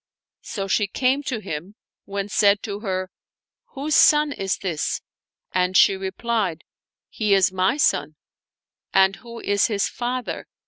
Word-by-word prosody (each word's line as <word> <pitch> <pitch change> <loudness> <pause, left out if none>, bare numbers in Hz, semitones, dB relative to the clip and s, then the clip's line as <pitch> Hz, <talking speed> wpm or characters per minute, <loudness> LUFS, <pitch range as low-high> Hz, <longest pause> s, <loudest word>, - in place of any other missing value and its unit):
" - - -70
So 195 -2 -5
she 205 +1 +1
came 260 +7 +1
to 235 -5 -3
him, 175 +4 -6 0.3
when 200 0 -4
said 205 0 +3
to 200 -1 -4
her, 185 -3 -3 0.3
" - - -70
Whose 290 +3 -1
son 300 -1 +5
is 195 -7 -2
this? 170 -6 -2 0.3
" - - -61
and 185 0 +1
she 195 - +6
replied, 190 -2 -2 0.3
" - - -70
He 210 -3 +1
is 190 -1 +3
my 190 +9 +1
son." 295 - +1 0.4
" - - -52
And 190 0 +4
who 235 +1 -10
is 200 0 +2
his 205 -2 0
father 250 0 -4
200 Hz, 170 wpm, -23 LUFS, 190-235 Hz, 0.4 s, she